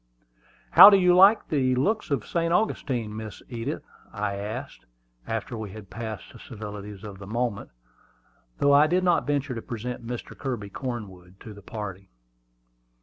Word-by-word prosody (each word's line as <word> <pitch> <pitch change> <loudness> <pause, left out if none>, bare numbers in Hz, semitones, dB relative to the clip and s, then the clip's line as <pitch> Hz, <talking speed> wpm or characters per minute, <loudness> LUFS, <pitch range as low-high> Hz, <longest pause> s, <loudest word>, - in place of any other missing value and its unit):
"How - - +11
do 200 - +6
you 180 -1 +4
like 195 +4 +6
the 130 -4 +2
looks 210 - 0
of 135 -7 -1
St. 170 -1 -1
Augustine, 125 - -1
Miss 110 -1 -8
Edith?" 120 +4 -4 0.3
I 105 -1 -2
asked, 100 +2 -6 0.4
after 115 +2 -3
we 110 -2 -5
had 105 -3 -11
passed 110 +3 -7
the 115 - -13
civilities 105 -3 -8
of 100 -2 -9
the 100 - -10
moment, 115 -1 -2 0.9
though 140 0 +4
I 145 +2 +6
did 180 +3 +1
not 175 -4 +2
venture 140 -2 -1
to 115 - -5
present 120 +1 -6
Mr. 120 0 -6
Kirby 120 -7 -5
Cornwood 95 -8 -7
to 110 - -9
the 100 - -13
party. 100 -2 -7
115 Hz, 160 wpm, -26 LUFS, 105-140 Hz, 0.9 s, How